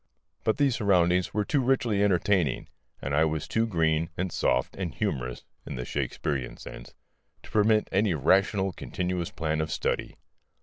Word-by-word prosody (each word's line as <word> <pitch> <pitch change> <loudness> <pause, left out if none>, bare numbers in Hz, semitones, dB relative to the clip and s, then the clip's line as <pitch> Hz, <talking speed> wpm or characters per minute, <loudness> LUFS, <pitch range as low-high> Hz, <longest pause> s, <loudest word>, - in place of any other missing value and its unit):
But 110 - +1
these 140 -4 +3
surroundings 90 -3 +3
were 105 0 0
too 145 +4 +1
richly 120 -5 +2
entertaining, 90 -6 +1 0.3
and 70 - -2
I 75 +2 +4
was 80 -1 -1
too 115 +1 +1
green 80 -4 +1
and 90 0 -2
soft - - 0
and 90 -6 -4
humorous 65 -1 -2 0.2
(in - - -6
the 60 0 -4
Shakespearean 65 -1 -3
sense) - - -10 0.5
to - - -13
permit 110 0 +3
any 95 -3 +2
rational 95 +6 +2
continuous 90 +1 -3
plan 80 -1 -1
of 80 0 -3
study. - - -2
90 Hz, 160 wpm, -27 LUFS, 80-105 Hz, 0.5 s, I